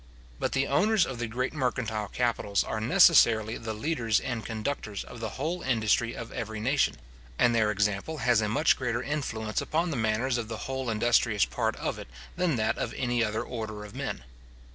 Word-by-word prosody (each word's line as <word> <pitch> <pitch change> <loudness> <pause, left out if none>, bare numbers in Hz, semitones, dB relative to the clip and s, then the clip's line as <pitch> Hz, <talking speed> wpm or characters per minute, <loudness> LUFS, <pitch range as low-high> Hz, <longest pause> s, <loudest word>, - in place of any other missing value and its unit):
But - - -1
the 135 +1 +2
owners 195 +7 +3
of 130 -3 -6
the 120 - -2
great 125 +5 -2
mercantile 120 -7 -1
capitals 110 -2 0
are 110 - -3
necessarily 115 - +5
the 110 -1 -4
leaders 115 -3 +1
and 120 -4 -4
conductors 110 -2 -4
of 120 - -11
the 110 -1 -3
whole 175 +3 -2
industry 115 -1 +1
of 115 - -7
every 110 -2 -5
nation; 130 +6 +1 0.4
and 120 - +4
their 110 -2 +3
example 105 +8 -1
has 125 -5 +3
a 105 - 0
much 150 +8 +3
greater 120 -1 -1
influence 115 -8 -2
upon 165 +2 0
the 140 - -2
manners 120 +3 +1
of 115 - -4
the 110 -1 -5
whole 130 -2 -3
industrious 115 -1 +3
part - - -1
of - - -3
it - - -8 0.3
than 180 -4 +1
that 110 -2 0
of - - -3
any 120 -2 +1
other 110 0 -1
order 110 -3 -6
of 105 - -11
men. - - -4
115 Hz, 190 wpm, -28 LUFS, 110-130 Hz, 0.4 s, necessarily